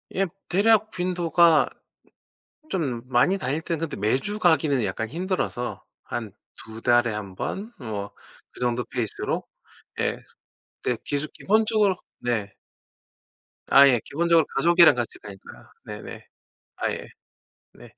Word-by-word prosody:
예. 195 - +2 0.2
대략 215 +3 +3
빈도가 175 -3 +3 1.0
좀 135 - -2
많이 130 +10 +3
다닐 150 -3 -2
땐 165 -1 -3
근데 165 -1 -3
매주 130 - -1
가기는 150 - +3
약간 100 +4 -3
힘들어서 175 -7 -3 0.2
한 115 -4 -5 0.3
2 110 +1 -10
달에 120 -2 +3
1 100 -3 -6
번 210 - -4
뭐 105 -5 -5 0.4
그 - - -15
정도 120 0 0
페이스로 115 -5 -2 0.6
예 - - 0 0.7
근데 125 -2 0
기수 145 +1 -2
기본적으로 215 -1 +2 0.2
네. 110 -5 -2 1.2
아 140 0 +8
예. 125 -4 +4
기본적으로 170 +2 +3
가족이랑 170 +1 +6
같이 120 -2 -3
가니까. 100 -2 -13
네네. - - -9 0.5
아 - - -1
예. - - -6 0.7
네. - - -14
140 Hz, 230 characters per minute, -25 LUFS, 120-180 Hz, 1.2 s, 아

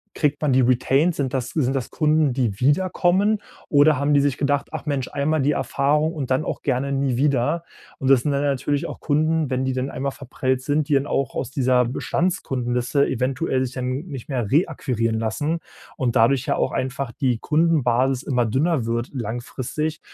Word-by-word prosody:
kriegt 150 -2 0
man 145 -3 +2
die 130 - +4
Retains? 135 +7 +2
Sind 135 -3 -2
das 125 -2 -2
sind 135 -3 0
das 130 -3 -2
Kunden, 155 -3 +2
die 120 -6 -1
wieder 145 +9 +3
kommen? 200 +4 +2 0.3
Oder 145 0 +4
haben 145 +2 +1
die 140 - +5
sich 140 -3 0
gedacht: 145 0 0
„Ach - - -6
Mensch, 140 -3 -1
einmal 150 +2 0
die 145 +3 +2
Erfahrung 145 +4 +1
und 140 -6 -4
dann 130 +3 +1
auch - - -4
gerne 135 0 -1
nie 135 -2 0
wieder.“ 145 +4 +1 0.3
Und 135 - -1
das 130 -3 +6
sind 150 - -1
dann 140 0 0
natürlich 140 0 0
auch - - -7
Kunden, 155 0 +1
wenn 130 0 -1
die 130 - 0
dann 130 +1 -2
einmal 140 +1 -3
verprellt 130 -1 -2
sind, 145 +2 0
die - - 0
dann 140 0 +2
auch 135 -2 -1
aus 130 - -3
dieser 125 -2 +2
Bestandskundenliste 130 -2 -1
eventuell 130 +1 -1
sich 125 - -7
dann 125 -1 -3 0.2
nicht 135 -6 -8
mehr 120 -7 -2
reakquirieren 125 -8 0
lassen 145 +9 -1 0.4
und 125 -5 -1
dadurch 130 +3 +3
ja 140 - +1
auch - - 0
einfach 130 -1 -3
die 125 -3 -1
Kundenbasis 135 -5 +2
immer 125 -4 0
dünner 135 +3 +1
wird 115 +1 -2
langfristig. 130 +6 -4
135 Hz, 195 wpm, -22 LUFS, 125-150 Hz, 0.4 s, das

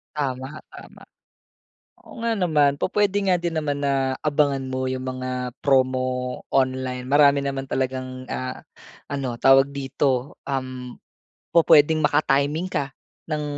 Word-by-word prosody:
Tama, 135 0 -3
tama. - - -14 1.0
Oo 235 - -11
nga 230 -1 0
naman. 150 -7 +2
Pu-puwede 200 +5 0
nga 180 -2 +2
din 170 -1 -3
naman 145 -2 -1
na 135 -2 0
abangan 145 -2 +1
mo 130 0 -2
yung 130 0 -3
mga 130 -1 -4
promo 130 -2 +1
online. 130 -1 0
Marami 140 0 +5
naman 135 -1 -3
talagang 130 -1 -4
ah, 130 0 -4 0.5
ano, 135 -4 -3
tawag 135 +1 +5
dito, 135 -1 -1
um, 130 -2 -4 0.6
pu-puwedeng 155 -1 +5
maka-timing 145 +3 +1
ka 145 -6 -3 0.4
ng 150 -1 -1
135 Hz, 125 wpm, -23 LUFS, 130-150 Hz, 1.0 s, Marami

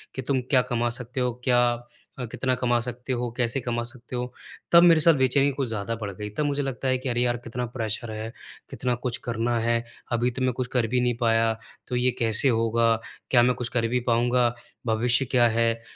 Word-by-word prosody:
कि 130 - -3
तुम 130 0 0
क्या 130 -3 +5
कमा 120 -1 -1
सकते 125 +2 -4
हो, 125 -1 0
क्या 120 -2 +4 0.5
अ, 125 - -3
कितना 130 -1 0
कमा 120 -1 +1
सकते 125 +2 -4
हो, 120 -1 -2
कैसे 120 +2 0
कमा 120 -1 -2
सकते 120 +1 -8
हो, 125 0 -4 0.4
तब 170 0 +8
मेरे 165 -2 +7
साथ 165 +2 +6
बेचैनी 135 0 +3
कुछ 135 -2 -2
ज़्यादा 110 0 -3
बढ़ 100 -1 -3
गई। 105 +2 -6
तब 150 - +1
मुझे 145 0 0
लगता 135 -1 -3
है 130 - +2
कि, 130 +1 -4
"अरे 120 0 0
यार 120 0 +1
कितना 120 +1 -5
प्रेशर 110 -1 -3
है, 110 +1 -5 0.4
कितना 125 -1 -2
कुछ 125 0 0
करना 120 0 0
है। 115 +1 +1 0.3
अभी 120 +1 +1
तो 130 +2 -6
मैं 130 -1 +1
कुछ 125 +1 -3
कर 120 -3 +2
भी 125 +2 +1
नहीं 120 -1 +1
पाया। 115 -1 +3 0.4
तो 125 - -3
ये 125 +1 +2
कैसे 115 +3 +2
होगा? 115 0 +2 0.4
क्या 120 -2 +6
मैं 125 0 +3
कुछ 125 -1 -3
कर 115 -2 0
भी 125 +2 0
पाऊँगा? 120 +1 +3 0.4
भविष्य 120 +4 +2
क्या 120 -2 +5
है?" 115 0 +1
120 Hz, 220 wpm, -25 LUFS, 115-125 Hz, 0.5 s, तब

